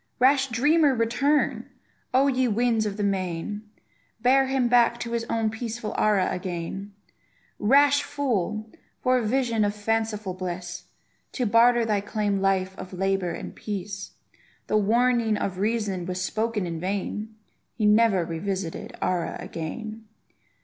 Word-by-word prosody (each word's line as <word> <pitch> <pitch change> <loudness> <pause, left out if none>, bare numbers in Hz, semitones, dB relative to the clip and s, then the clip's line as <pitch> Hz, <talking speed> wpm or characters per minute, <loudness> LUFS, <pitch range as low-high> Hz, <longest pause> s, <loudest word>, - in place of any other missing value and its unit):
Rash 265 +1 +4
dreamer, 285 +4 +3
return! 260 +6 +1 0.4
O, 260 +2 +4
ye 260 -2 +2
winds 225 -1 +1
of 200 0 -4
the 210 - -1
main, 195 +2 -2 0.5
Bear 265 +3 +4
him 265 -2 +1
back 235 -1 +4
to 235 - -4
his 235 -1 -1
own 225 -2 0
peaceful 225 0 -5
Ara 205 -3 +3
again. 185 +2 -4 0.7
Rash 285 +5 +5
fool! 220 -7 -2 0.3
for 255 0 +3
a - - -2
vision 230 -1 +1
of 205 0 0
fanciful 215 -2 -1
bliss, 180 -1 -5 0.5
To 250 - -1
barter 235 +2 +5
thy 210 -2 +1
calm 205 -1 -1
life 190 -1 +1
of 185 - -8
labour 195 0 0
and - - -7
peace. 200 -1 -5 0.5
The - - -1
warning 230 +1 +2
of 185 -2 -3
reason 205 -4 -1
was 180 0 -3
spoken 215 +2 -1
in 165 -2 -4
vain; 205 +4 -3 0.4
He 220 - 0
never 210 -4 +4
revisited 175 +1 -4
Ara 180 -2 -1
again! 215 +7 -6
215 Hz, 140 wpm, -25 LUFS, 195-240 Hz, 0.7 s, Rash